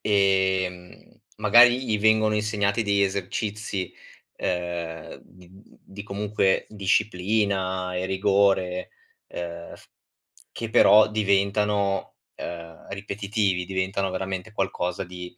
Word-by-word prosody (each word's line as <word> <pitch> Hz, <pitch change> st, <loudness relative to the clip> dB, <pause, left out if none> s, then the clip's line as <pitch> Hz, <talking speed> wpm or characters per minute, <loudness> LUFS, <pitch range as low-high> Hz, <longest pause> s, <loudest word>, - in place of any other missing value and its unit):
ehm, 95 Hz, -3 st, 0 dB, 0.2 s
magari 120 Hz, +4 st, +6 dB
gli 110 Hz, -3 st, 0 dB
vengono 110 Hz, 0 st, +3 dB
insegnati 105 Hz, 0 st, 0 dB
degli 100 Hz, -1 st, +1 dB
esercizi, 100 Hz, 0 st, -3 dB, 0.4 s
uhm, 85 Hz, -2 st, -4 dB
di 90 Hz, 0 st, -19 dB
di 100 Hz, 0 st, -13 dB
comunque 100 Hz, -1 st, 0 dB
disciplina 95 Hz, -2 st, 0 dB
e 90 Hz, +1 st, -2 dB
rigore, 95 Hz, -1 st, +1 dB, 0.4 s
ehm, 85 Hz, -1 st, -7 dB
f -, -, -17 dB, 0.7 s
che 115 Hz, -, -6 dB
però 110 Hz, -1 st, +6 dB
diventano, 100 Hz, -1 st, 0 dB, 0.2 s
ehm, 85 Hz, -1 st, -8 dB
ripetitivi, 100 Hz, -2 st, -2 dB
diventano 95 Hz, +1 st, -1 dB
veramente 95 Hz, +2 st, -4 dB
qualcosa 90 Hz, -3 st, -2 dB
di 90 Hz, 0 st, -10 dB
95 Hz, 100 wpm, -25 LUFS, 90-105 Hz, 0.7 s, magari